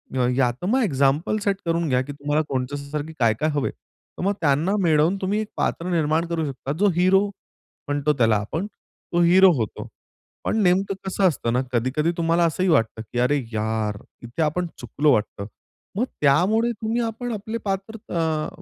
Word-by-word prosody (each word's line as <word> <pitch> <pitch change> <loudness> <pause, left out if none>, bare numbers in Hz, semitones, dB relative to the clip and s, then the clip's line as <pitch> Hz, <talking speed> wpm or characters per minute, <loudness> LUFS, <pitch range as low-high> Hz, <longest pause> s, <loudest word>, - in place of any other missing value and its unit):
या 125 -2 +2
यात 130 +4 0
मग 255 +7 +2
एक्झाम्पल 145 +3 +1
सेट 200 -1 +1
करून 170 -1 0
घ्या 125 -1 +2
की 135 +2 -6
तुम्हाला 145 +2 0
कोणच्यासारख 140 +3 -3
काय-काय 115 +6 +2
हवं 145 -2 0
आहे, - - -3
तर - - -14
मग 200 +2 +2
त्यांना 155 +6 +2
मिळवून 160 +2 +3
तुम्ही 195 +3 0
एक 215 - -5
पात्र 170 +2 -1
निर्माण 160 -1 +1
करू 165 -2 -1
शकता. 135 -1 -5
जो 195 +8 +2
हिरो 185 +3 +4 0.6
म्हणतो 145 +1 +1
त्याला 115 -3 +4
आपण, 155 - -3
तो 175 -3 -5
हिरो 185 +2 +7
होतो. 110 -4 -4 0.6
पण - - 0
नेमकं 190 +2 +2
कसं 190 0 +2
असतं 120 -8 -1
ना, 125 - +2
कधी-कधी 130 +7 +1
तुम्हाला 170 0 +2
असंही 185 +3 0
वाटतं 115 -8 +2
की 115 +2 -5
अरे 135 +4 +3 0.2
यार! 110 -1 -1 0.3
इथे 120 +7 -5
आपण 175 +4 0
चुकलो 140 +5 +1
वाटतं. 105 -1 -2 0.5
मग 240 - +2 0.2
त्यामुळे 190 +12 +3
तुम्ही 225 +2 -2
आपण 235 +1 -3
आपले 220 +2 -4
पात्र 195 +3 -3
अ, 160 -2 0
160 Hz, 175 wpm, -23 LUFS, 135-190 Hz, 0.6 s, हिरो